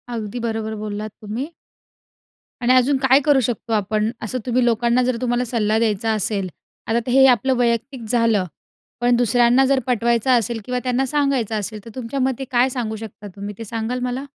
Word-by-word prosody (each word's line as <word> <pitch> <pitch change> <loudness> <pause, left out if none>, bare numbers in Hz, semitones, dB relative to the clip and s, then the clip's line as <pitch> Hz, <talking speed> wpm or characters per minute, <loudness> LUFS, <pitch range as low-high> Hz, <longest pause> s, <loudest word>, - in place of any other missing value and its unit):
अगदी 220 +1 -4
बरोबर 220 -1 -3
बोललात 210 0 -5
तुम्ही. 225 +8 -4 1.1
आणि 245 +1 +3
अजून 255 +2 +4
काय 265 0 +4
करू 290 -3 +5
शकतो 230 -1 -2
आपण 215 +1 0
असं 220 +4 -3
तुम्ही 250 0 +1
लोकांना 235 +1 +2
जर 250 -1 0
तुम्हाला 245 0 0
सल्ला 220 -2 0
द्यायचा 225 -1 0
असेल. 200 -2 -2 0.4
आता 235 +2 0
हे 265 +1 +6
आपलं 260 +1 +3
वैयक्तिक 240 +1 -1
झालं, 230 -5 +2 0.6
पण 245 0 +4
दुसऱ्यांना 245 +2 +4
जर 270 0 +3
पटवायचं 235 +1 +1
असेल 235 -1 +1
किंवा 250 0 -2
त्यांना 255 +1 +1
सांगायचं 270 -5 0
असेल 210 +2 -5
तर - - -9
तुमच्या 255 +1 -4
मते 265 0 0
काय 250 +1 +3
सांगू 240 -4 -3
शकता 215 -1 -9
तुम्ही 200 +1 -6
ते 230 - -6
सांगाल 230 +3 -3
मला? 250 +2 -2
235 Hz, 175 wpm, -21 LUFS, 220-255 Hz, 1.1 s, हे